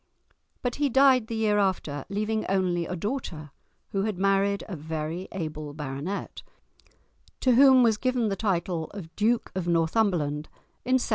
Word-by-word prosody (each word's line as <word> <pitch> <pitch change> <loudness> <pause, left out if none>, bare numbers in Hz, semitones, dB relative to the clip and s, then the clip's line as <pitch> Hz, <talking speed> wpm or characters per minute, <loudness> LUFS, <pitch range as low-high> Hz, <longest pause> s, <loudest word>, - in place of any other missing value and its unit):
But 245 -1 -2
he 290 -1 +1
died 265 -2 +5
the 230 - -4
year 215 -2 +2
after, 165 -8 -1
leaving 215 +2 -1
only 180 -3 +1
a 180 - -3
daughter, 170 - -4 0.4
who 195 - -1
had 210 -2 -2
married 195 +1 +2
a 195 - -5
very 160 +3 -4
able 155 -5 -5
baronet, 150 +6 -5 1.0
to 255 - +4
whom 260 0 +7
was 225 -3 +3
given 250 -2 0
the 195 - -1
title 180 -5 -1
of 165 -5 -9
Duke 225 +3 +1
of 185 -2 -3
Northumberland 165 -3 +1 0.4
in 255 +1 +3
1766. 255 - -3
195 Hz, 155 wpm, -27 LUFS, 165-225 Hz, 1.0 s, whom